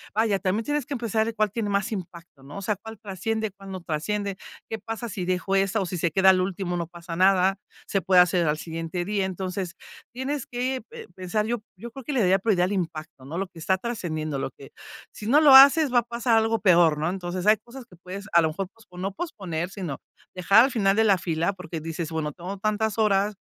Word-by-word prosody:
vaya, 215 Hz, -3 st, +2 dB
también 205 Hz, +4 st, -1 dB
tienes 295 Hz, -2 st, -1 dB
que 280 Hz, -, -3 dB
pensar, 225 Hz, -2 st, 0 dB
de 230 Hz, -, -3 dB
cuál 215 Hz, -2 st, +1 dB
tiene 215 Hz, -1 st, -2 dB
más 200 Hz, +2 st, 0 dB
impacto, 175 Hz, -7 st, -8 dB
¿no? 140 Hz, +5 st, -10 dB
O -, -, -5 dB
sea, 210 Hz, +1 st, 0 dB
cuál 220 Hz, +3 st, -11 dB
trasciende, 220 Hz, +2 st, -3 dB
cuál 195 Hz, 0 st, -13 dB
no 185 Hz, -1 st, -6 dB
trasciende, 195 Hz, +6 st, -2 dB, 0.3 s
¿qué 220 Hz, -, -5 dB
pasa 225 Hz, +2 st, -5 dB
si 185 Hz, -2 st, -4 dB
dejo 185 Hz, +2 st, 0 dB
esa, 195 Hz, +3 st, +2 dB
o 195 Hz, -, -1 dB
si 180 Hz, 0 st, -4 dB
se 170 Hz, -, +1 dB
queda 190 Hz, +3 st, +6 dB
al 185 Hz, -, +2 dB
último?, 185 Hz, -1 st, -2 dB
¿no 170 Hz, -2 st, -3 dB
pasa 170 Hz, 0 st, -8 dB
nada? 190 Hz, +1 st, +3 dB, 0.3 s
¿Se 195 Hz, -, -1 dB
puede 180 Hz, +2 st, +4 dB
hacer 180 Hz, -1 st, +4 dB
al 150 Hz, 0 st, +1 dB
siguiente 165 Hz, +2 st, -4 dB
día? 200 Hz, 0 st, 0 dB
Entonces, 185 Hz, -1 st, -4 dB, 0.4 s
tienes 265 Hz, +2 st, -4 dB
que 255 Hz, +1 st, -2 dB
pe 465 Hz, -1 st, -10 dB
pensar. 190 Hz, +3 st, -2 dB
Yo 235 Hz, -1 st, -2 dB, 0.2 s
yo 235 Hz, +5 st, -9 dB
creo, 270 Hz, +3 st, -10 dB
que 290 Hz, -, -4 dB
le 255 Hz, -, +1 dB
daría 190 Hz, +1 st, +4 dB
prioridad, 185 Hz, -4 st, +2 dB
al 190 Hz, -, -3 dB
impacto, 160 Hz, -7 st, -5 dB
¿no? 155 Hz, +5 st, -6 dB
Lo 195 Hz, +1 st, -2 dB
que 170 Hz, -2 st, -15 dB
está 190 Hz, +4 st, +1 dB
trascendiendo. 155 Hz, -, -3 dB
Lo -, -, -2 dB
que, 135 Hz, -, -14 dB, 0.4 s
si 210 Hz, -, -8 dB
no 290 Hz, +5 st, +5 dB
lo 295 Hz, -3 st, +7 dB
haces, 280 Hz, +1 st, +8 dB
va 245 Hz, -, +6 dB
a -, -, -2 dB
pasar 235 Hz, 0 st, +1 dB
algo 225 Hz, 0 st, +2 dB
peor 170 Hz, -5 st, +5 dB
¿no? 155 Hz, +3 st, 0 dB
Entonces, 180 Hz, 0 st, -4 dB
hay 215 Hz, +1 st, +6 dB
cosas 240 Hz, +4 st, -12 dB
que 230 Hz, -, -18 dB
puedes, 185 Hz, +4 st, -8 dB
a 170 Hz, -, +7 dB
lo 160 Hz, -, +1 dB
mejor, 185 Hz, +5 st, -4 dB
pospo 210 Hz, -6 st, -18 dB
no 190 Hz, +2 st, -3 dB
posponer, 185 Hz, -, -4 dB
sino, 185 Hz, -8 st, -6 dB, 0.3 s
dejar 200 Hz, +6 st, +5 dB
al 270 Hz, -, -2 dB
final 195 Hz, -3 st, +2 dB
de 220 Hz, -, +4 dB
la 200 Hz, -3 st, +5 dB
fila. 165 Hz, +3 st, -1 dB
Porque 175 Hz, -3 st, -7 dB
dices, 165 Hz, +1 st, -5 dB
bueno, 155 Hz, -2 st, -2 dB
tengo 185 Hz, +5 st, -7 dB
tantas 215 Hz, +2 st, -1 dB
horas 205 Hz, -1 st, +2 dB
195 Hz, 240 wpm, -25 LUFS, 175-220 Hz, 0.4 s, haces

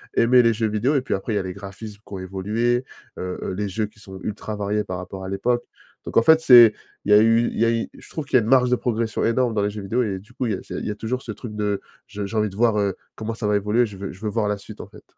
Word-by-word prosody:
aimer 125 Hz, +2 st, +6 dB
les 115 Hz, -1 st, +3 dB
jeux 110 Hz, 0 st, 0 dB
vidéo. 110 Hz, +7 st, +1 dB
Et 135 Hz, -, +3 dB
puis, 130 Hz, -, -3 dB
après, 100 Hz, +3 st, -2 dB
il -, -, 0 dB
y -, -, +2 dB
a -, -, -2 dB
les 95 Hz, 0 st, -5 dB
graphismes 100 Hz, +2 st, -9 dB
qui -, -, -12 dB
ont 95 Hz, -, -4 dB
évolué, 105 Hz, +7 st, -1 dB, 0.3 s
heu, 90 Hz, 0 st, -4 dB
heu, -, -, -3 dB
les 100 Hz, +2 st, -2 dB
jeux 110 Hz, +3 st, -1 dB
qui 105 Hz, -, -22 dB
sont 95 Hz, -2 st, -10 dB
ultra 105 Hz, +1 st, -4 dB
variés 105 Hz, +1 st, -1 dB
par 90 Hz, -3 st, -5 dB
rapport 95 Hz, +1 st, -7 dB
à 95 Hz, -, -5 dB
l'époque. 120 Hz, +5 st, 0 dB, 0.4 s
Donc -, -, -7 dB
en -, -, +7 dB
fait, 160 Hz, +6 st, +6 dB
c'est 120 Hz, -7 st, +8 dB, 0.3 s
il 105 Hz, -, 0 dB
y -, -, +8 dB
a -, -, +9 dB
eu 115 Hz, +1 st, +4 dB
il -, -, -4 dB
y 115 Hz, -, +4 dB
a -, -, +3 dB
eu 115 Hz, -1 st, -1 dB
je -, -, -14 dB
trouve 155 Hz, -, -4 dB
qu'il 135 Hz, -, -2 dB
y -, -, +6 dB
a -, -, 0 dB
une 110 Hz, -, -4 dB
marge 125 Hz, -2 st, +5 dB
de 125 Hz, -, +4 dB
progression 115 Hz, -3 st, -1 dB
énorme 120 Hz, +1 st, +1 dB
dans 105 Hz, -, +1 dB
les 100 Hz, -, +1 dB
jeux 105 Hz, 0 st, -6 dB
vidéo 115 Hz, +6 st, 0 dB
et 100 Hz, -4 st, -3 dB
du 105 Hz, +5 st, -19 dB
coup, 125 Hz, -, -2 dB
il 110 Hz, -, 0 dB
y -, -, 0 dB
a -, -, -6 dB
c'est -, -, -8 dB
il -, -, -4 dB
y -, -, -1 dB
a 105 Hz, -, -5 dB
toujours 125 Hz, +4 st, -3 dB
ce 115 Hz, -, -6 dB
truc 115 Hz, -1 st, -8 dB
de: 105 Hz, -1 st, -1 dB, 0.3 s
«Je 105 Hz, 0 st, -5 dB
j'ai 110 Hz, +3 st, -4 dB
envie 105 Hz, -1 st, +2 dB
de 95 Hz, -, -12 dB
voir, 115 Hz, 0 st, +3 dB
heu, 100 Hz, -2 st, 0 dB, 0.2 s
comment 110 Hz, +1 st, -4 dB
ça 110 Hz, -1 st, -5 dB
va 105 Hz, -, +3 dB
évoluer, 105 Hz, +4 st, +2 dB
je 100 Hz, -3 st, -9 dB
veux 100 Hz, 0 st, -5 dB
je 95 Hz, -, -16 dB
veux 110 Hz, -, -2 dB
voir 105 Hz, 0 st, 0 dB
la 105 Hz, -, 0 dB
suite», 100 Hz, -, -12 dB
en -, -, -9 dB
fait. -, -, -16 dB
105 Hz, 340 wpm, -23 LUFS, 100-115 Hz, 0.4 s, a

